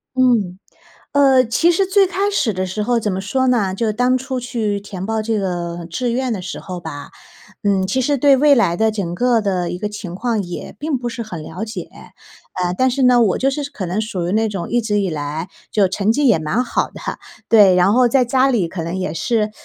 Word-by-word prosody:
嗯。 230 -8 +2 0.6
呃， 270 -2 +5
其 280 +9 +2
实 390 +3 +2
最 385 0 +3
开 390 +2 0
始 245 - +1
的 185 +1 -2
时 185 +4 -4
候 240 +1 +1
怎 210 -3 -1
么 185 - -2
说 260 +7 -1
呢， 210 -7 +1
就 230 - -1
是 215 - +1
当 250 +3 +2
初 260 0 -4
去 220 -4 -2
填 195 -2 -7
报 220 0 -1
这 220 0 -1
个 175 -3 -3
志 245 +7 -2
愿 255 -1 -1
的 195 -4 -3
时 180 - -6
候 180 -2 -6
吧， 145 -4 -8 0.5
嗯， 195 -2 +2
其 225 +7 -1
实 280 +2 +1
对 275 0 +5
未 290 0 +5
来 175 -8 +2
的 220 0 +3
整 190 -5 -3
个 240 +3 +2
的 180 -4 -1
一 180 - -4
个 210 +3 -3
情 190 -4 -7
况 230 0 -1
也 175 -1 -7
并 295 -2 -1
不 240 -1 -4
是 235 0 -6
很 175 -8 -7
了 185 +9 -6
解。 220 - -7 0.7
呃， 180 0 0
但 260 0 +3
是 270 +1 0
呢， 250 -1 +5
我 200 -5 +2
就 270 - +1
是 285 +1 -4
可 190 - -5
能 180 +5 -2
属 185 -5 -3
于 - - -2
那 220 +1 +2
种 195 -4 -5
一 240 - +2
直 210 -2 0
以 190 - -1
来， 155 +3 -4 0.2
就 200 -3 +2
成 200 +3 +1
绩 285 0 +2
也 220 - +5
蛮 190 +11 0
好 - - -1
的， - - -11 0.5
对， 205 -5 +6
然 180 +3 +4
后 250 0 +5
在 255 +1 +3
家 260 +2 +2
里 210 -9 +1
可 170 -1 -5
能 170 +2 -4
也 175 -4 -3
是 215 +5 0
215 Hz, 255 characters per minute, -19 LUFS, 185-250 Hz, 0.7 s, 对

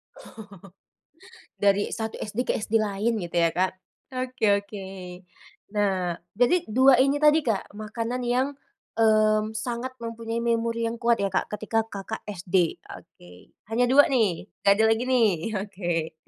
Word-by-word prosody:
Oh, - - -14 1.3
dari 205 0 +2
1 220 -1 -4
SD 210 +2 -5
ke - - +2
SD 220 +1 0
lain 215 +2 -1
gitu, 175 -1 -6
ya, 170 -1 +3
Kak, 185 +1 0 0.4
oke 255 -2 -5 0.2
oke. 200 -1 -8 0.9
Nah, 190 -4 0 0.2
jadi 250 - +2
2 260 +2 +6
ini 280 +1 +1
tadi 300 +1 +5
Kak, 205 -3 -2
makanan 230 +3 -4
yang, 245 +2 +1 0.5
mmm, 215 -1 +3
sangat 235 +3 -4
mempunyai 230 0 -4
memori 230 0 0
yang 230 - -3
kuat, 235 -1 +1
ya, 200 - +1
Kak, 190 0 -2
ketika 220 +1 -1
Kakak 200 +2 -6
SD, 180 -3 -1
oke, 90 - -13 0.4
hanya 225 +3 +1
2 290 +2 +7
nih? 210 - 0 0.2
Nggak 200 - +6
ada - - +5
lagi, 225 +2 +2
nih? 235 -4 +5 0.3
Oke. 175 -5 -3
220 Hz, 150 wpm, -25 LUFS, 200-235 Hz, 1.3 s, 2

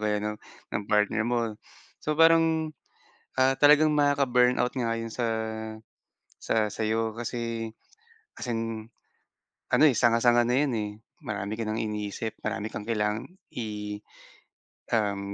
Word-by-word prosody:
kaya 105 -1 +1
ng 105 0 -2 0.4
ng 105 - 0
partner 105 +1 +2
mo. 115 -3 -1 0.5
So 150 - +1
parang, 165 -1 +4 0.7
ah, 130 +1 +4
talagang 150 +1 +6
makaka-burnout 125 -4 +3
nga 115 -3 0
'yon 115 0 -5
sa 120 - -1 1.2
sa 110 -1 +1
sa'yo, 110 +1 -1
kasi 115 -1 -3 0.7
as - - -6
in 115 -1 -3 0.8
ano, - - +5
eh, - - +5
sanga-sanga 120 0 +4
na 125 - +2
yun, 145 - +1
eh, 105 -1 -2 0.3
marami 105 0 -4
ka - - 0
ng 110 +1 -1
iniisip, 105 +1 -4
marami 110 0 -2
kang 105 - -6
kailangan 105 -1 0 0.3
i 105 -2 -4 1.0
um, 100 -2 0
115 Hz, 130 wpm, -27 LUFS, 105-125 Hz, 1.2 s, talagang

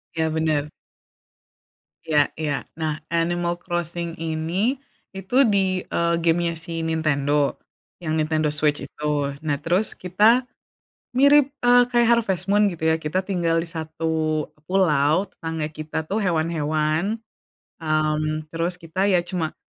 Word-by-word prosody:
Iya 160 -1 +1
bener. 155 -2 0 1.4
Iya. 155 -2 +3 0.2
Iya. 150 -2 -1 0.3
Nah 155 -1 -2
Animal 170 +1 0
Crossing 170 -1 -4
ini, 165 - -1 0.4
itu 190 +5 -5
di, 190 -3 +2
eee, 170 0 0
game-nya 170 0 +1
si 165 0 -5
Nintendo, 150 -3 +1 0.5
yang 155 -1 -1
Nintendo 155 0 +1
Switch 150 0 0
itu. 150 - -11 0.4
Nah, 150 -2 +1
terus 180 +7 0
kita 215 +8 +3 0.7
mirip, 280 +1 +5
eee, 245 0 +7
kayak 240 -1 +3
Harvest 195 -5 +1
Moon 205 0 +4
gitu 170 -5 -5
ya. 160 - +1
Kita 160 +5 -1
tinggal 175 -4 0
di - - -9
satu 160 -1 -2 0.2
pulau, 180 0 +2
tetangga 160 -2 -4
kita 155 +1 -4
tuh, 210 - 0
hewan-hewan, 160 -3 0 0.8
mmm, 155 -1 -1
terus 170 +2 -2
kita 185 +4 -1
ya 180 -3 +3
cuma 170 -3 -3
165 Hz, 130 wpm, -23 LUFS, 155-185 Hz, 1.4 s, eee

